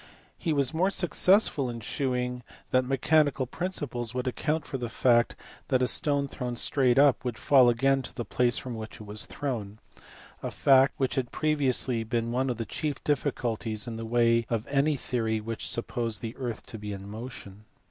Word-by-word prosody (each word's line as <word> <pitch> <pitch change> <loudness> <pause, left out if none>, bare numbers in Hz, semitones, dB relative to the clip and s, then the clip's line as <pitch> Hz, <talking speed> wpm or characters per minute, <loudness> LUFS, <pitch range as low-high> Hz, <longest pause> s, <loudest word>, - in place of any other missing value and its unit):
He 170 - -2
was 140 -1 +1
more 180 +4 +2
successful 185 - +3
in 120 -1 -5
shewing 125 +1 -2 0.3
that 130 0 +4
mechanical 140 +1 +2
principles 125 -7 -4
would 125 0 -2
account 150 +4 -1
for 135 - -4
the 120 -1 -3
fact 120 0 +3 0.3
that 130 -2 +2
a - - +3
stone 140 +1 +1
thrown 125 -3 -4
straight 125 +1 +2
up 140 -1 +5
would 120 -3 -3
fall 130 -1 +5
again 135 +3 +2
to - - -8
the 120 - -4
place 125 0 +1
from 125 - -5
which 110 -1 -7
it - - -12
was 105 +1 -4
thrown 110 -8 -4 0.6
a - - -3
fact 135 0 +4
which 130 -2 0
had 125 -3 -2
previously 135 -6 +1
been 115 0 -2
one 130 +2 0
of 120 - -2
the 115 - -3
chief 150 +4 -4
difficulties 120 -6 -1
in 115 -2 -5
the 115 - -5
way 115 0 +2
of 115 -1 -1
any 145 +2 +2
theory 115 -3 -1
which 110 +1 -4
supposed 115 -1 -2
the 115 -1 -5
earth 120 -4 -5
to 115 -3 -9
be 105 0 -6
in 100 0 -7
motion. 105 -2 -9
125 Hz, 190 wpm, -28 LUFS, 115-140 Hz, 0.6 s, up